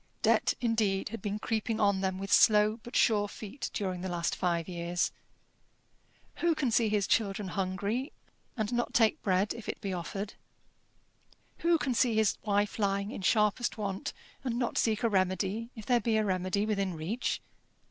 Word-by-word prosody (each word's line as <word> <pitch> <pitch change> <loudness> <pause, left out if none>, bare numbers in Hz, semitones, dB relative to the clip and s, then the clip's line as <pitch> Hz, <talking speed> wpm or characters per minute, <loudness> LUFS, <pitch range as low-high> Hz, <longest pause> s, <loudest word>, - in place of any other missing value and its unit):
Debt, - - +3
indeed, 215 -5 +1
had 230 -1 -6
been 205 +1 -2
creeping 220 0 -2
on 200 -2 +3
them 190 -1 -1
with 195 +1 -2
slow 215 0 +5
but 240 - -10
sure 210 -3 +3
feet 215 +6 -6
during 185 -4 -3
the 190 - -3
last 170 -1 -1
five 170 -2 0
years. 175 -1 -1 1.3
Who 335 -1 +2
can 275 -6 0
see 225 0 +3
his 210 -2 +1
children 200 -2 0
hungry, 200 - -2 0.5
and 220 +1 -1
not 240 0 -1
take 225 -2 +4
bread 190 +1 +1
if 230 -2 -8
it - - -4
be 195 -3 -3
offered? 195 +4 -4 1.3
Who 335 0 +3
can 275 -5 -1
see 235 0 +2
his 220 -1 +2
wife 205 0 0
lying 200 0 0
in - - -6
sharpest 210 +4 +2
want, 195 -2 -3 0.3
and 240 -3 -1
not 245 -1 -1
seek 220 0 +1
a - - +4
remedy 195 +2 0
if 220 -3 -9
there 245 -1 +3
be 220 +1 +1
a 215 - +2
remedy 185 +1 0
within 195 -4 -1
reach? 185 +11 -2
210 Hz, 175 wpm, -30 LUFS, 190-225 Hz, 1.3 s, slow